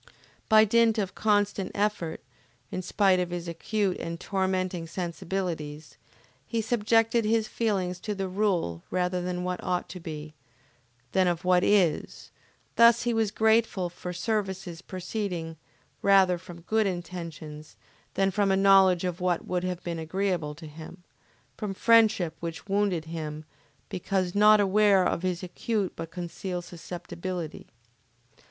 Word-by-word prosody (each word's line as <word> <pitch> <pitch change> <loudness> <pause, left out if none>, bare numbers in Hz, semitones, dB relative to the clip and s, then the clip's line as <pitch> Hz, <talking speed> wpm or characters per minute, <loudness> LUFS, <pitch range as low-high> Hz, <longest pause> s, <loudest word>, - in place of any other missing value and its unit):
By 215 -1 +7
dint 230 +1 +3
of 195 -3 -1
constant 205 -2 +1
effort, 205 -6 -1 0.5
in 185 - -3
spite 185 0 +3
of 180 -1 -1
his 175 -1 -5
acute 190 +3 -1
and 170 0 -5
tormenting 185 -3 -1
sensibilities, 170 -3 -4 0.5
he 230 - -1
subjected 225 +1 +2
his 220 0 +1
feelings 190 -6 -1
to 210 +2 -4
the 195 -1 -2
rule 185 - 0
rather 180 0 0
of 180 0 -3
what 180 0 -3
ought 180 -1 -1
to 180 - -7
be, 155 -2 -7 0.8
than 190 -1 +3
of 175 +1 -1
what 180 0 +4
is; 185 -7 +1 0.5
thus 235 0 +6
he 240 -1 +1
was 225 -2 +1
grateful 220 -4 +2
for 180 0 -6
services 190 -3 -3
proceeding 185 -3 -4 0.5
rather 190 -3 +5
from 170 -1 -11
good 215 +4 +1
intentions 170 -4 -6 0.4
than 195 0 +2
from 200 +1 +1
a 190 - +3
knowledge 195 -2 +5
of 180 0 -3
what 180 -2 0
would 180 -1 -1
have 180 -1 -3
been 170 -1 -3
agreeable 165 -2 -2
to 160 +1 -11
him; 160 +4 -11 0.5
from 200 -2 -4
friendship 215 -7 +4
which 165 -1 -6
wounded 195 -5 0
him, 155 -2 -6 0.4
because 185 0 -2
not 210 +1 +6
aware 200 -1 +4
of - - 0
his 180 -1 -2
acute 195 +2 -2
but 165 0 -6
concealed 175 +1 -5
susceptibility. 175 -1 -6
185 Hz, 140 wpm, -27 LUFS, 170-205 Hz, 0.8 s, By